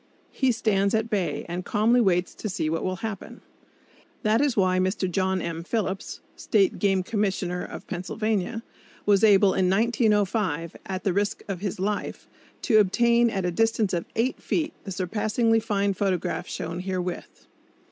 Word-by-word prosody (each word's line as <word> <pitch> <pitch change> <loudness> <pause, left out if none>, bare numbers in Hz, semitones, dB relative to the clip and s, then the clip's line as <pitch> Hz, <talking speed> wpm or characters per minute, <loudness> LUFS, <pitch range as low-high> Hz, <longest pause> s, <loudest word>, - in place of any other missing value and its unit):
He 265 -2 +2
stands 205 -3 +1
at 220 +1 -1
bay, 195 -4 -1
and 175 +1 -4
calmly 225 +6 +3
waits 180 -4 +1
to 215 - -5
see 170 -5 -1
what 165 - -1
will 185 0 -1
happen. 215 -3 -7 0.8
That 215 +3 +3
is 285 -5 +1
why 185 -2 +3
Mr. 190 +1 0
John 185 0 0
M. 165 0 -4
Phillips, 195 0 -3
State 390 -3 +1
Game 195 -3 +2
Commissioner 190 -4 -1
of - - -8
Pennsylvania, 215 +4 -2 0.4
was 205 0 +4
able 200 -2 +6
in 185 -1 +2
1905, 205 -6 +1
at 190 0 -4
the 195 - +1
risk 200 +2 -1
of 195 -3 -4
his 195 -3 -3
life, 205 +2 -3 0.4
to 220 -5 +5
obtain 235 +4 +3
at 195 -4 -2
a 180 - 0
distance 225 +1 +1
of 170 -1 -1
eight 240 +4 0
feet 315 -2 -1
the 195 - -5
surpassingly 215 +5 +1
fine 200 -3 0
photograph 190 -2 -1
shown 165 +2 -5
herewith. 185 -1 -5
200 Hz, 160 wpm, -25 LUFS, 185-220 Hz, 0.8 s, able